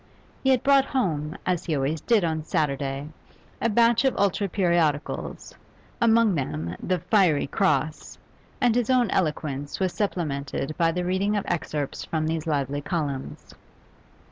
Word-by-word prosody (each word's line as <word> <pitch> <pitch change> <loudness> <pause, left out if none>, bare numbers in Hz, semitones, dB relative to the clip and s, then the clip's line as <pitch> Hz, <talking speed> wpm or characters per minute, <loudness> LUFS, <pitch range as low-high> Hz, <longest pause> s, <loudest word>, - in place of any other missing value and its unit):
He 265 - +2
had 260 -2 +3
brought 275 -1 +5
home, 160 - -1
as 180 -2 -1
he 160 - 0
always 140 +3 -1
did 230 -5 +3
on 160 -2 -1
Saturday, 140 -2 -1 0.5
a 230 - +2
batch 230 +2 +4
of 265 - +1
ultra 200 0 +1
periodicals, 170 -5 -1 0.5
among 230 -2 +4
them 85 - -3
the 185 - 0
'Fiery 180 -4 +2
Cross,' 150 +2 -1 0.4
and 245 -4 +3
his 245 0 0
own 250 -5 +3
eloquence 145 -4 -2
was 185 -2 0
supplemented 150 -7 -2
by 165 -1 +2
the 180 +1 -2
reading 195 +3 +1
of 200 - -2
excerpts 150 -4 -3
from 155 -1 -2
these 160 0 -2
lively 145 -2 -1
columns. 145 -5 -4
165 Hz, 145 wpm, -25 LUFS, 145-205 Hz, 0.5 s, brought